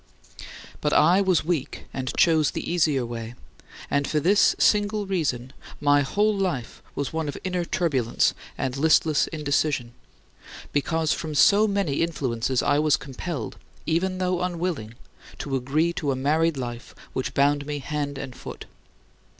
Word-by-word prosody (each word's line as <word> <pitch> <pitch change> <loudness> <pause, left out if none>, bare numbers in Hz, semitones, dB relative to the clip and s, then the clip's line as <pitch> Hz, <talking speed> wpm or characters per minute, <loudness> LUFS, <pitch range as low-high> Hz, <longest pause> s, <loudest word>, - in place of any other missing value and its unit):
But 150 - +1
I 175 +6 +5
was 185 -5 +2
weak 160 -6 -2
and 130 -1 -3
chose 160 -4 +4
the - - -4
easier 150 -7 +2
way, 115 0 -6 0.5
and 140 0 0
for 155 - +1
this 195 +7 +4
single 210 0 +2
reason 140 -9 -2 0.3
my 145 0 +4
whole 210 +9 +1
life 180 -12 -3
was 140 +1 -3
one 160 -1 -2
of 145 - -4
inner 180 -2 -1
turbulence 145 -10 +1 0.2
and 130 -1 -2
listless 155 +1 +3
indecision, 145 -5 -1 0.8
because 160 +2 +1
from 155 -2 -5
so 205 +9 +5
many 195 -9 0
influences 130 -6 -1
I 145 0 +3
was 155 -1 +3
compelled 135 -1 -6 0.3
even 185 +4 0
though 180 -1 0
unwilling 170 -10 -3 0.4
to 140 -2 -3
agree 150 +6 +1
to 150 -4 -1
a - - 0
married 155 +4 +1
life 120 -2 -6 0.2
which 130 - -3
bound 145 +1 +2
me 150 -1 -2
hand 145 0 -3
and 130 -2 -7
foot. - - -9
150 Hz, 150 wpm, -25 LUFS, 135-175 Hz, 0.8 s, I